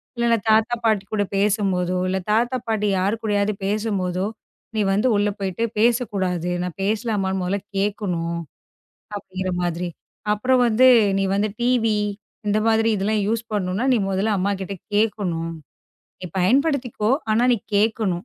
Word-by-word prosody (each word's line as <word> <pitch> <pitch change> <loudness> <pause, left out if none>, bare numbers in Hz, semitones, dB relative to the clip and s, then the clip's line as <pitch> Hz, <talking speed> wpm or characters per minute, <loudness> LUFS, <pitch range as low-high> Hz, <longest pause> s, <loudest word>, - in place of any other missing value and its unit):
இல்லன்னா 235 -1 +2
தாத்தா, 220 +2 +4
பாட்டி 215 -3 +2
கூடப் 205 -2 -1
பேசும்போதோ, 195 -3 +1
இல்ல 190 +1 0
தாத்தா, 240 +4 +2
பாட்டி 210 -2 0
யார் 200 +4 +1
கூடயாவது 205 -1 +1
பேசும்போதோ, 195 -3 -1 0.5
நீ 215 - +1
வந்து 210 +6 +2
உள்ள 205 0 +2
போயிட்டு 195 +3 -2 0.2
பேசக் 235 0 +2
கூடாது. 180 -3 -1
நான் 180 0 -5
பேசலாமான்னு 205 -3 -1
முதல்ல 190 +3 -1 0.2
கேக்கணும்" 180 -5 -1 0.8
அப்படிங்கிற 185 -2 -4
மாதிரி. 175 +1 -2 0.4
அப்புறம் 255 +4 +2
வந்து, 240 +3 +5 0.3
"நீ 195 - +1
வந்து 210 +1 +1
டிவி 230 -3 +2 0.5
இந்த 210 +1 +2
மாதிரி 225 0 +3
இதெல்லாம் 205 +2 0
யூஸ் 230 +1 0
பண்ணனும்னா 195 +2 -1
நீ 245 - +4
முதல்ல 195 +3 0
அம்மா 200 +2 0
கிட்ட 195 +1 -5 0.2
கேக்கணும். 190 -6 0 0.7
நீ - - -7
பயன்படுத்திக்கோ 250 - +1 0.2
ஆனா 235 +3 +3
நீ 235 - +1 0.2
கேக்கணும்" 205 -4 +1
205 Hz, 140 wpm, -22 LUFS, 190-225 Hz, 0.8 s, வந்து